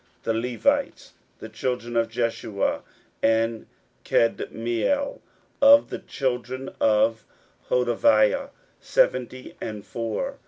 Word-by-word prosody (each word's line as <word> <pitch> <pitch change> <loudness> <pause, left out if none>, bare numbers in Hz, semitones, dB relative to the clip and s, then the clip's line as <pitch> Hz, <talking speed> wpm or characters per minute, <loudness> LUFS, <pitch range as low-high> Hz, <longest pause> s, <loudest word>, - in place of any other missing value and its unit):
16:007:043 - - -39
The 115 - 0 0.2
Levites: 120 -3 0 0.2
the 110 - -9
children 120 +1 -3
of 115 -1 +2
Jeshua, 115 -3 -1 0.4
of 115 0 +1 0.4
Kadmiel, 120 - 0
and - - -20 0.4
of 285 +1 +7
the - - -4
children 130 -1 -3
of 110 +1 +2 0.5
Hodevah, 290 - +3 0.3
seventy 130 - 0
and 105 -2 -6
four. 270 - -4
120 Hz, 105 wpm, -24 LUFS, 115-135 Hz, 0.5 s, of